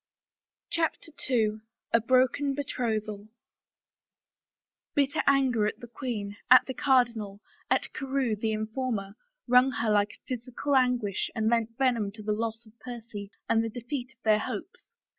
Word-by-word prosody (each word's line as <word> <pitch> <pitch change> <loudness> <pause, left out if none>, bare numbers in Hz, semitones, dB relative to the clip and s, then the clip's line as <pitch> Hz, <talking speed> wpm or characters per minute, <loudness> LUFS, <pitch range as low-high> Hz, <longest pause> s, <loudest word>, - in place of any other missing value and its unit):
CHAPTER 325 0 -1 0.2
II 220 -4 +2 0.3
A 230 - +6
BROKEN 260 +3 +2
BETROTHAL 220 -6 -2 1.7
©ITTER 280 -1 +2
anger 260 -6 +4
at - - -4
the - - -8
queen, 220 -5 -5
at 255 +1 +8
the 260 - -4
cardinal, 235 -7 +1 0.3
at - - +1
Carewe, 270 -4 -1
the 220 +1 -1
informer, 215 -2 -2 0.3
wrung 250 +2 +6
her 225 -3 0
like 205 0 +2
a - - -21
physical 255 +3 -2
anguish 245 -6 +2
and 220 0 +1
lent 230 -1 0
venom 240 -7 +1
to 215 0 -9
the 210 0 0
loss 225 +1 -3
of 220 +2 -21
Percy 225 -5 -8 0.2
and 225 0 +3
the 225 - -2
defeat 250 +3 -5
of 235 - -46
their 215 -1 +4
hopes. 470 - -7
235 Hz, 145 wpm, -28 LUFS, 215-255 Hz, 1.7 s, at